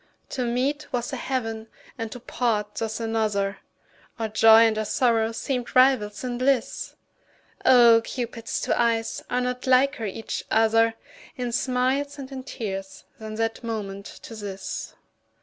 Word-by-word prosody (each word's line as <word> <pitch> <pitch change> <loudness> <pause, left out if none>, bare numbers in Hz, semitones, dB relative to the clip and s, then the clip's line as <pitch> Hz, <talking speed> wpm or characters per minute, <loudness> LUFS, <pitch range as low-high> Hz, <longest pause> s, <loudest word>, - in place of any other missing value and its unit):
To 255 - -2
meet 260 +6 -1
was 245 0 -2
a - - 0
heaven 225 -4 -3 0.3
and 225 -4 -5
to 245 - -7
part 215 -4 -1
thus 225 0 -3
another, 215 -3 -1 0.6
Our 225 -2 -2
joy 220 +1 +7
and 220 -1 +2
our - - 0
sorrow 225 0 +2
seemed 250 +1 -3
rivals 255 -5 +4
in 245 -1 -3
bliss; 255 -2 0 0.7
Oh! 235 -3 +7
Cupid's 235 -2 -4
two - - 0
eyes 230 -1 0
are 250 0 0
not 250 +1 -3
liker 260 -1 +3
each 220 +3 -4
other 225 0 +3 0.4
In 245 -1 -2
smiles 260 +4 0
and 275 -1 -8
in 265 -1 -5
tears 195 -7 -6 0.2
than 215 -1 -6
that 225 +2 -2
moment 200 -3 -4 0.2
to 225 - -9
this. 195 -3 -6
230 Hz, 150 wpm, -25 LUFS, 220-255 Hz, 0.7 s, joy